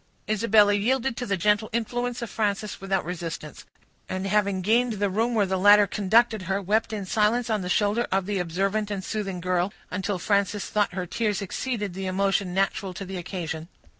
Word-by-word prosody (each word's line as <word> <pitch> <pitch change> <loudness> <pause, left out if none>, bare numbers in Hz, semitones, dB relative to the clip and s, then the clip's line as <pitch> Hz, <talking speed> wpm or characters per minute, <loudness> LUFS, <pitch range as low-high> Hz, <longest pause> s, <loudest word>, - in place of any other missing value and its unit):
Isabella 215 -1 +4
yielded 235 +4 +1
to 245 - -3
the 200 -1 0
gentle 210 +3 +2
influence 240 +2 -2
of 235 - -5
Frances 210 -2 -2
without 195 -2 -1
resistance; 165 -3 -6 0.4
and, 185 +1 -3
having 200 -2 +1
gained 235 +4 +2
the 205 -1 -1
room 230 +4 0
where 210 -2 +3
the 190 0 -1
latter 205 +1 +7
conducted 215 +3 +2
her, 195 +1 +1
wept 210 +3 0
in 205 -3 -4
silence 225 +4 +1
on 215 -2 +1
the 180 - -4
shoulder 210 +4 +1
of 190 0 +1
the 200 -1 -1
observant 195 +5 -1
and 200 -2 -3
soothing 195 -4 -3
girl, 180 +2 0 0.2
until 190 +1 -2
Frances 200 +2 0
thought 210 -3 +1
her 180 -2 -2
tears 210 +2 -1
exceeded 205 0 -3
the 190 +1 -4
emotion 195 0 0
natural 195 0 -1
to 195 - -6
the 190 0 -6
occasion. 165 -3 -5
200 Hz, 190 wpm, -25 LUFS, 190-215 Hz, 0.4 s, latter